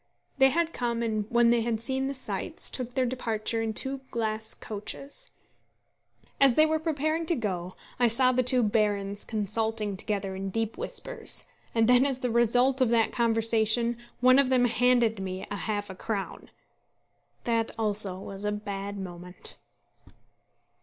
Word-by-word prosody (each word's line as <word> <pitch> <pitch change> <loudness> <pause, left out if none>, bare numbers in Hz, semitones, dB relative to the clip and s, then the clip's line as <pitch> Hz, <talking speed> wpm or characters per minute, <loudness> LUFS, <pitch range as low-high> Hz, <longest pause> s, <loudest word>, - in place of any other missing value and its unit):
They 270 0 +7
had 335 +3 0
come 235 -1 -2
and, 215 -2 -2
when 235 0 +4
they 235 -1 +3
had 225 -1 -1
seen 265 +3 +1
the 275 - -4
sights, 260 - -4
took 250 -1 -5
their 260 - +2
departure 230 -2 -1
in 225 -1 -1
two 265 +5 0
glass 220 -1 -3
coaches. 275 - -4 1.1
As 270 -3 +5
they 310 - +6
were 315 0 0
preparing 315 +1 -1
to 340 - +1
go, 185 - -4 0.2
I 245 - +5
saw 255 +3 +5
the 255 0 +2
two 250 0 +4
barons 205 -2 0
consulting 215 0 -1
together 195 0 -3
in 195 +1 -4
deep 225 +2 -2
whispers, - - -2 0.3
and 225 -1 +3
then 250 +1 +6
as 270 -2 0
the 250 -2 -2
result 245 +3 +3
of 255 - +4
that 225 -1 +2
conversation 230 0 +2 0.3
one 255 +1 +6
of 275 -2 +3
them 255 -1 +3
handed 240 -2 +2
me 185 0 -5
half 205 0 -2
a - - -9
crown! 200 0 -5 0.9
That 230 -1 0
also 210 -4 +1
was 195 +1 -8
a 210 - 0
bad 200 -1 -5
moment. 180 -1 -6
230 Hz, 160 wpm, -27 LUFS, 210-255 Hz, 1.1 s, They